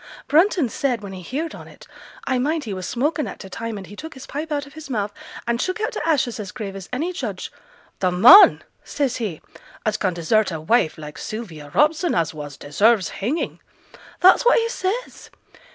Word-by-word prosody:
Brunton 330 - +3
said, 245 0 -1
when 195 -1 -7
he 185 - -8
heared 290 - -4
on - - -10
it - - -15 0.4
I 260 -2 0
mind 305 +4 0
he 215 - -5
was 185 -1 -5
smoking 295 +5 0
at - - -8
t' 190 - -9
time, 230 +2 -5
and 195 - -8
he 205 - -12
took 320 +7 -9
his 265 0 -10
pipe 305 +3 -5
out 290 -1 -1
of 280 - -15
his 315 -2 -10
mouth, 210 -4 -2 0.3
and 235 0 0
shook 370 +3 -2
out 435 +2 -1
t' - - -3
ashes 270 -8 +1
as 200 -3 -6
grave 205 -5 -6
as 195 -2 -9
any 315 +8 -2
judge 370 - -5 0.5
"The 185 - +2
man," 240 - +8 0.2
says 275 -5 -1
he, 210 -10 -4 0.4
"as 215 0 +1
can 185 -3 -1
desert 215 +6 +2
a 160 - -4
wife 160 +1 +1
like 150 -1 -9
Sylvia 170 -10 -7
Robson 320 +3 +3
as 165 -2 0
was, 145 -2 -8
deserves 200 +5 +2
hanging!" 255 - -3 0.6
That's 370 +1 +7
what 485 - +5
he 460 -1 +1
says! 460 +2 -4
240 Hz, 205 wpm, -22 LUFS, 195-310 Hz, 0.6 s, man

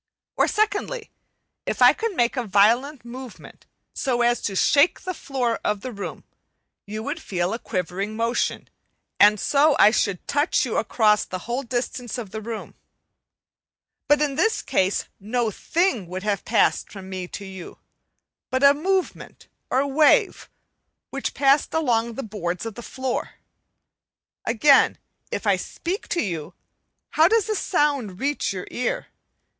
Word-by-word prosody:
Or, - - +3
secondly, 430 +2 -1 0.6
if - - -2
I - - +8
could 455 -3 -3
make 240 -1 +1
a 250 - -1
violent 235 +7 +3
movement 250 0 -11 0.3
so 245 -3 0
as 240 0 +2
to 200 - -3
shake 285 - +3
the 370 - -4
floor 250 -7 -2
of 210 -1 -1
the 255 - -5
room, 200 -3 -7 0.6
you 215 +2 -5
would 295 +5 -4
feel 180 - -2
a 230 - -3
quivering 195 +1 -3
motion; 230 +2 -1 0.5
and 210 0 +6
so 290 +5 +3
I 210 - +7
should 200 -5 -1
touch 290 +3 +1
you - - -2
across 210 -2 +3
the 185 -1 -7
whole 240 +3 -2
distance 245 0 -4
of 220 -6 -6
the 220 +1 -5
room. 225 0 -6 1.3
But 295 0 +4
in 290 -2 0
this 445 +7 +1
case 190 +1 +1
no 225 +2 -1
thing 320 - 0
would 185 +2 -6
have 205 -3 -1
passed 225 - +2
from 195 -2 -9
me 185 -1 -5
to 200 - -8
you 190 -2 -9 0.7
but 260 +1 -1
a 280 0 +8
movement 370 +5 -3 0.2
or 265 +2 +2
wave, 310 - +3 0.6
which 275 0 -4
passed 275 +2 +3
along 235 -7 +1
the 270 - -4
boards 180 -3 -4
of 225 - -5
the 240 - -9
floor. 260 +1 -4 1.1
Again, 270 +5 +4 0.3
if - - -3
I - - +3
speak 370 +4 -5
to 345 - 0
you, 165 -7 -5 0.6
how 320 +1 +5
does 445 +1 +3
the 435 -1 -1
sound 280 - 0
reach 285 -3 -1
you 185 -2 -5
ear? 250 - -2
240 Hz, 155 wpm, -23 LUFS, 210-290 Hz, 1.3 s, I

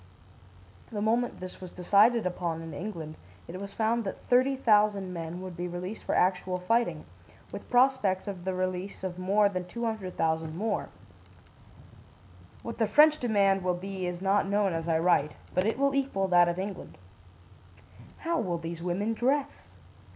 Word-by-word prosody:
The 210 - -3
moment 230 +3 0
this 185 0 -9
was 185 - -7
decided 210 +6 +3
upon 170 -2 -2
in 165 -1 -8
England, 160 -2 -6 0.3
it 185 +3 -7
was 200 0 -6
found 230 +1 +1
that 195 - -6
30,000 215 -7 +3
men 170 +1 -5
would 185 -2 -7
be 175 +1 -4
released 180 +4 -6
for - - 0
actual 180 0 +1
fighting, 230 +6 0 0.5
with - - -8
prospects 245 -7 +3
of 190 -3 -5
the 190 0 -2
release 185 +1 -3
of 185 -1 -4
more 200 +3 +3
than 185 -2 -3
200,000 180 -8 -2
more. 215 +2 -2 1.7
What 230 0 -6
the 225 - +3
French 305 +3 +6
demand 200 -5 +2
will 180 -1 +1
be 190 0 -4
is 180 +1 -5
not 195 +1 +2
known 200 -2 +2
as 165 0 -3
I 165 -1 +2
write, 160 -3 +2 0.2
but 185 +3 +1
it 225 - 0
will 280 0 +2
equal 265 -9 0
that 175 -1 +5
of 175 - -2
England. 190 0 -6 1.3
"How 335 0 +1
will 180 -5 -1
these 165 0 -6
women 185 +6 -1
dress? 265 +5 -1
190 Hz, 160 wpm, -29 LUFS, 180-220 Hz, 1.7 s, French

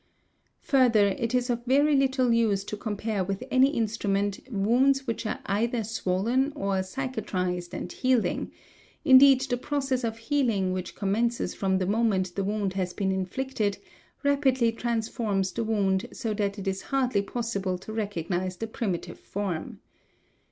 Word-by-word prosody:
Further, 240 -7 +4
it 230 +5 -2
is 250 0 +1
of 240 0 -2
very 285 +3 +4
little 265 -3 +2
use 215 -4 +2
to 210 - -5
compare 210 -1 -2
with 195 +1 -3
any 260 +1 +5
instrument 205 -5 -1
wounds 255 +6 +2
which 230 -2 -3
are - - -3
either 225 +4 0
swollen 225 +6 0
or 195 -7 0
cicatrised 185 -6 -3
and 180 - -5
healing; 255 -3 0 0.5
indeed 270 -1 +8
the 265 -2 -1
process 265 -1 -1
of 225 -1 -2
healing 225 -7 0
which 185 -1 -5
commences 220 +1 0
from 190 -1 0
the 185 - 0
moment 200 -3 +1
the 195 - -2
wound 200 -1 -1
has 185 -2 -2
been 195 -1 -1
inflicted, 205 +2 -2 0.5
rapidly 265 -4 +3
transforms 225 -4 -1
the 230 - -2
wound 195 -4 +1
so 225 -4 -3
that 205 -1 -1
it 195 -1 -6
is 190 0 -1
hardly 255 -6 +1
possible 200 -4 -2
to 205 +4 -9
recognise 185 -3 -2
the 225 - -3
primitive 215 -5 -4
form. 195 -5 -4
220 Hz, 150 wpm, -27 LUFS, 195-250 Hz, 0.5 s, indeed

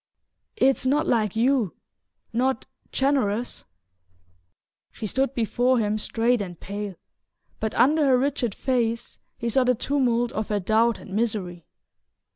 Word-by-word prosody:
"It's 270 -9 +3
not 295 +4 +2
like 215 -4 +1
you... 240 -4 +2 0.6
not 255 +2 0 0.3
generous..." 245 -5 0 1.3
She - - -7
stood 265 +5 0
before 245 +2 +2
him 215 -1 0
straight 230 +2 +1
and 180 -4 -6
pale, 200 -1 -5 0.6
but 220 0 -2
under 295 +5 +4
her 260 -2 +5
rigid 255 -5 -1
face 235 -3 -1 0.2
he 235 - -3
saw 255 +3 +3
the 250 0 +3
tumult 245 -2 +1
of 215 0 -3
her 210 -1 +1
doubt 220 +4 +2
and 190 - -11
misery. 195 -6 -2
235 Hz, 130 wpm, -25 LUFS, 215-260 Hz, 1.3 s, her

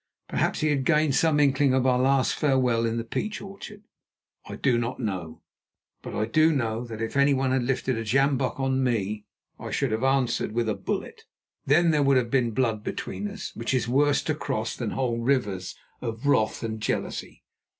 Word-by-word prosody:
Perhaps - - -1
he 155 - +2
had 140 -2 0
gained 150 -1 +3
some 155 +1 +3
inkling 140 -1 +3
of 130 -1 +1
our 125 -1 +3
last 135 0 +3
farewell 125 -5 +2
in 115 +1 -2
the 115 - -2
peach 210 - -3
orchard. 200 +1 -10 0.7
I - - -5
do 125 -4 +1
not 120 +1 -3
know. 95 -9 -4 0.6
But - - -7
I 110 - 0
do 155 +8 +3
know 115 -5 -1
that 115 -1 -5
if 115 - -4
anyone 140 -1 +3
had 130 0 +2
lifted 130 -1 -1
a - - -3
sjambock 135 +3 +1
on 135 0 +1
me 105 -4 -1 0.3
I - - -6
should 135 -4 -1
have 110 +3 -1
answered 135 -5 +1
with 115 0 0
a 110 - +1
bullet. - - -5 0.4
Then 165 +4 +4
there 150 -2 +2
would 140 -1 +4
have 120 -2 0
been 125 -3 +2
blood 110 -2 -1
between 205 - -4
us, 205 -1 -7
which 115 +3 -1
is 120 -2 0
worse 140 +3 +2
to - - 0
cross - - -3
than - - -3
whole 120 -3 -1
rivers 115 -7 -1 0.3
of 115 +1 -5
wrath 110 -7 +2
and 110 -1 -4
jealousy. - - -3
130 Hz, 195 wpm, -26 LUFS, 115-140 Hz, 0.7 s, Then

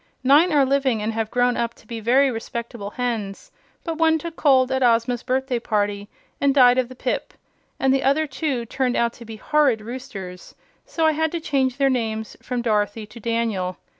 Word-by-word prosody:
Nine 295 +7 +5
are 285 -3 +4
living 265 -4 +1
and 220 +1 -2
have 220 -1 -2
grown 245 0 +2
up 235 0 -2
to - - -21
be 230 +1 -6
very 260 +5 +3
respectable 230 -2 -6
hens; 220 -4 -4 0.3
but 330 -2 -4
one 320 -1 +4
took 330 +1 -7
cold 265 -3 +3
at 265 0 0
Ozma's 240 0 +2
birthday 260 -1 -1
party 205 -2 -2 0.3
and 280 -1 +3
died 250 -2 +6
of 250 -1 -1
the 255 - -11
pip, - - -3 0.4
and 265 0 +3
the 270 - +2
other 280 +4 +2
two 270 -4 -3
turned 250 +1 -1
out 235 0 +1
to 235 - -13
be 225 0 -8
horrid 275 0 +2
roosters, 200 -6 -8 0.3
so 330 -10 -1
I 315 - +5
had 320 0 0
to 340 - -1
change 265 -5 0
their 275 -1 +3
names 220 -3 -3
from 245 -1 -3
Dorothy 210 -1 0
to 215 +3 -13
Daniel. 220 -5 -2
245 Hz, 195 wpm, -22 LUFS, 225-275 Hz, 0.4 s, died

